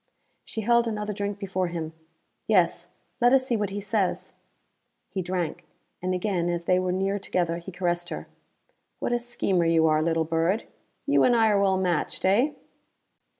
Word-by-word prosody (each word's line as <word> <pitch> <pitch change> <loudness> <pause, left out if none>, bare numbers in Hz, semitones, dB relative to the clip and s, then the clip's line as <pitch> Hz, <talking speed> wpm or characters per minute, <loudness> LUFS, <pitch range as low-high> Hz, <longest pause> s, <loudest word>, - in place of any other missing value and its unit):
She 220 - -5
held 235 +2 +3
another 210 -1 -2
drink 200 0 -3
before 190 -2 -2
him. 165 -2 -5 0.5
"Yes. 175 -4 +2 0.3
Let 245 +1 +5
us 265 -1 +4
see 245 - 0
what 210 -3 -1
he 200 +1 -4
says." 205 -2 -1 0.8
He 190 - -2
drank; 175 -1 -3 0.4
and 185 +1 0
again 180 -2 0
as 170 0 -2
they 180 +1 +3
were 185 0 0
near 195 +2 0
together 175 -3 -1
he 175 +2 -8
caressed 175 -1 -1
her. - - -5 0.7
"What - - -2
a 240 - +2
schemer 200 -7 0
you 165 -1 +4
are, 155 -1 +3
little 165 0 +1
bird. 165 +7 +1 0.4
You 285 - +4
and 245 - +5
I 225 -1 +4
are 200 -1 +3
well 190 -1 +3
matched, 180 -3 -1
eh?" 235 +11 +3
190 Hz, 175 wpm, -26 LUFS, 175-210 Hz, 0.8 s, Let